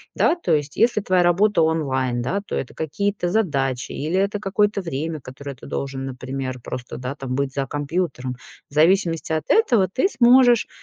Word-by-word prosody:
да? - - +3
То 345 - -1
есть 145 -1 -3
если 230 -1 +3
твоя 185 -2 +2
работа 175 +2 +3
онлайн, 130 -6 0
да, 185 +12 -1
то - - -4
это 130 - -4
какие-то 180 +4 -2
задачи 140 - 0
или 160 +6 -2
это 200 +1 0
какое-то 205 0 +1
время, 160 -1 -4
которое 140 +2 -8
ты - - -14
должен, 135 -1 -4
например, 130 0 -5
просто, 125 +1 -6
да, 130 +2 -5
там 135 -3 -5
быть 140 0 -1
за 135 0 -1
компьютером. 145 -3 -3 0.3
В - - -20
зависимости 165 +1 +2
от 155 -1 -1
этого 240 - +4
ты 255 - +1
сможешь 245 - +5
160 Hz, 175 wpm, -22 LUFS, 135-200 Hz, 0.3 s, сможешь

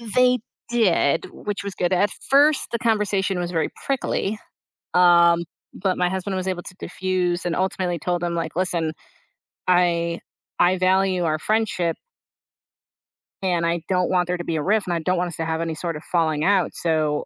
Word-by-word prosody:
They 250 -1 +4 0.3
did, 200 -11 +2
which 205 -1 -5
was 200 -2 -5
good. 180 +1 0
At 200 +3 +3 0.2
first, 285 +1 +4
the 235 - -1
conversation 205 -4 +1
was 175 0 -3
very 165 -2 0 0.2
prickly, 220 -6 -1 0.6
um, 170 -1 +5 0.3
but 185 -1 -1
my 180 0 +2
husband 190 +1 -3
was 185 0 -2
able 180 -1 -2
to 185 - -10
diffuse 180 -1 -1
and 175 - -1
ultimately 185 -2 -1
told 175 +2 -2
him 170 -1 -1
like, 165 0 -3
"Listen, 170 -3 0 0.8
I 170 -2 +2 0.4
I 180 +1 +4
value 185 0 +2
our 155 -1 0
friendship" 205 -4 0 1.5
and 175 -3 0
I 170 0 0
don't 180 -2 +1
want 180 -1 +2
there 180 0 -1
to 175 - -5
be 165 - -2
a 155 - 0
rift, 205 +4 +1
and 175 - 0
I 170 - 0
don't 180 +3 0
want 175 0 0
us 170 - -7
to 165 - -2
have 160 0 -1
any 165 -1 -2
sort 165 0 -4
of 150 - -8
falling 160 -3 +1
out. 190 -2 +2
So 155 -3 0
180 Hz, 185 wpm, -23 LUFS, 170-190 Hz, 1.5 s, um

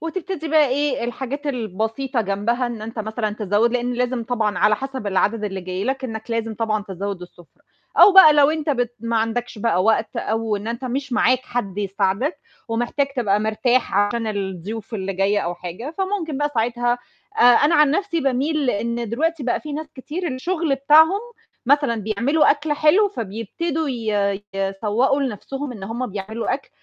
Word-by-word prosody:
وتبتدي 330 0 -4
بقى 305 -2 +4
إيه 285 -1 0
الحاجات 265 +4 -4
البسيطة 230 +1 -2
جنبها 220 +5 0
إن 235 -3 -6
أنت 225 +1 -7
مثلًا 220 0 -2
تزوّد، 215 +2 +1
لإن 245 0 0
لازم 245 -1 -1
طبعًا 220 -3 -1
على 210 0 +4
حسب 265 -3 -5
العدد 210 +3 +1
اللي 195 -2 -3
جاي 185 +1 -4
لك 265 +2 -2
إنّك 220 -1 -6
لازم 225 -1 -2
طبعًا 215 -1 -1
تزود 195 0 -4
السُفرة، 175 -1 -16 0.4
أو 410 - +9
بقى 380 -5 +9
لو 290 0 +5
أنت 310 -1 -1
بت 245 -3 -1
ما 230 0 -1
عندكش 225 +1 -2
بقى 205 -4 +1
وقت 225 0 +1
أو 220 0 -1
إن 205 +2 -6
أنت 235 +3 -4
مش 265 +2 -3
معاك 255 0 +3
حد 200 -5 -3
يساعدك، 200 - -1 0.3
ومحتاج 240 +5 0
تبقى 210 -4 +2
مرتاح 235 +3 +1
عشان 205 +3 +1
الضيوف 200 +2 -4
اللي 195 -2 -3
جاية 195 +2 +1
أو 175 -2 -3
حاجة، 180 - -7
فممكن 375 -7 -2
بقى 295 0 0
ساعتها 240 +1 0 0.4
آآ - - +4
أنا 245 +7 +6
عن 300 -3 +5
نفْسي 335 0 0
باميل 275 +1 +1
إن 235 +2 -2
دلوقتي 320 +5 -1
بقى 245 -1 0
في 300 - -7
ناس 310 +2 -4
كتير 320 +7 -4
الشغل 320 +3 -1
بتاعهم، 315 +8 +5 0.5
مثلًا 285 -2 +3
بيعملوا 235 +9 +2
أكل 295 +1 0
حلو 315 +8 +4
فبيبتدوا 290 - -3
ي 210 -5 -1
يسوّقوا 210 +8 0
لنفْسهم 270 +3 -4
إن 210 -5 -10
هُم 235 +5 -3
بيعملوا 215 +3 -3
أكل، 275 - -8
240 Hz, 170 wpm, -21 LUFS, 210-285 Hz, 0.5 s, أو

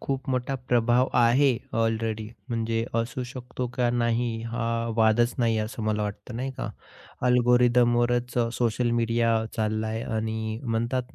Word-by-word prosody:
खूप 135 0 -3
मोठा 130 +1 -1
प्रभाव 120 +1 +3
आहे 125 +2 +4 0.2
ऑलरेडी 110 -1 -1 0.2
म्हणजे 115 -1 -1 0.2
असू 120 +2 -4
शकतो 125 -1 -5
का 125 -2 +1
नाही 120 0 +1 0.2
हा 120 0 -2 0.3
वादच 115 +2 +3
नाही 115 -2 +2
असं 110 +1 -4
मला 105 0 0
वाटतं 105 +3 -5
नाही 130 +3 -3
का - - -4 0.6
अल्गोरिदमवरच 120 0 +3 0.2
सोशल 120 0 +1
मीडिया 115 0 +1 0.3
चालला 110 0 0
आहे 110 +1 -3
आणि 110 0 -2
म्हणतात 120 +1 -2
120 Hz, 135 wpm, -26 LUFS, 110-125 Hz, 0.6 s, आहे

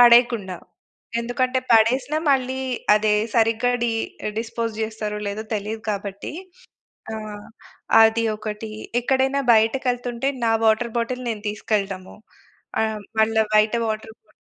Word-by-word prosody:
పడేయకుండా. 235 -6 +5 0.6
ఎందుకంటే, 255 +2 0
పడేసి‌న 245 +6 +4
మళ్ళీ 260 -1 +1 0.4
అదే 215 0 +2 0.2
సరిగ్గా 225 +1 +3
డి 240 - +2 0.5
డిస్పోజ్ 230 0 -3
చేస్తారో 215 -1 -3
లేదో 205 +2 -3
తెలీదు 215 +2 -3
గాబట్టి. 200 -1 -4 0.8
ఆహ్, 215 -1 -7 0.6
అది 225 +1 +4
ఒకటి. 215 0 -6 0.3
ఎక్కడైనా 265 +2 +1
బయటకేళ్తుంటే, 245 +2 +1 0.2
నా 225 - +3
వాటర్ 220 +2 +2
బాటిల్ 250 +2 -2
నేను 215 -2 -4
తీసుకెళటము. 200 -3 -3 0.7
ఆ - - +3 0.4
మళ్ళా 220 0 +4
బయట 215 +1 +4
వాటర్ 220 0 -4
బా - - -28
225 Hz, 110 wpm, -23 LUFS, 215-245 Hz, 0.8 s, పడేయకుండా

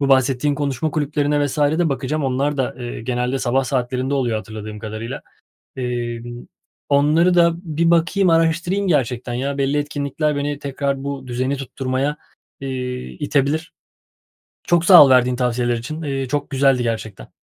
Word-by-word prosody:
Bu 140 - +1
bahsettiğin 135 +2 +3
konuşma 145 +1 -2
kulüplerine 145 -1 0
vs. 140 - -5
de 155 +4 +2
bakacağım. 140 +2 -2
Onlar 140 +3 0
da, 130 - -1
eee, 120 -2 -6
genelde 125 +2 -1
sabah 130 +1 +1
saatlerinde 130 +1 -1
oluyor 120 -5 0
hatırladığım 110 0 -7
kadarıyla. 110 +4 -6 0.5
Emm, 120 -1 -4 0.4
onları 155 +5 +3
da 170 -1 +5
bir 170 -1 0
bakayım, 175 +2 +3
araştırayım 170 +4 +1
gerçekten 125 -6 0
ya. 140 +3 -2
Belli 140 +2 +1
etkinlikler 145 +1 -2
beni 145 0 -2
tekrar 140 -1 -3
bu 140 -2 -5
düzeni 130 +3 -1
tutturmaya, 135 +2 -2 0.4
iii, 125 -2 -5
itebilir. 145 +2 0 0.9
Çok 175 -1 +3
sağ 175 -4 +10
ol 135 - +3
verdiğin 125 -1 +4
tavsiyeler 120 -1 0
için. 155 +8 -6
İii, 135 -3 -3
çok 145 +1 -2
güzeldi 135 -2 +3
gerçekten. 110 - -4
135 Hz, 150 wpm, -20 LUFS, 125-150 Hz, 0.9 s, sağ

